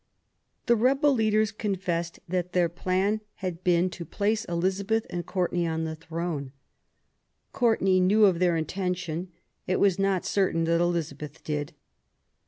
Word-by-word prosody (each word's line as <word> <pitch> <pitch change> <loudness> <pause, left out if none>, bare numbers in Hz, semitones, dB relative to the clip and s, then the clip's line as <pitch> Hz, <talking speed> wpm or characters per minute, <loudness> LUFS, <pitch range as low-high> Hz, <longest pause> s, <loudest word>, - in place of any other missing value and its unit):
The 235 - +4
rebel 270 +5 +3
leaders 215 -2 +2
confessed 180 -5 -2
that 180 0 -2
their 175 -2 +3
plan 190 +5 0
had 180 -2 -5
been 180 -1 +3
to 175 - -7
place 215 +6 -1
Elizabeth 195 +5 0
and 175 -1 -3
Courtenay 175 -2 0
on 160 0 -1
the 160 0 -3
throne. 165 -4 -4 1.0
Courtenay 220 -7 +3
knew 205 +4 +5
of 185 -4 +3
their 175 -2 +3
intention; 180 0 -3 0.4
it 185 - +1
was 195 -2 +3
not 195 -2 +1
certain 185 -4 +1
that 165 +1 +2
Elizabeth 155 -4 -3
did. 150 -1 -3
180 Hz, 140 wpm, -27 LUFS, 170-200 Hz, 1.0 s, knew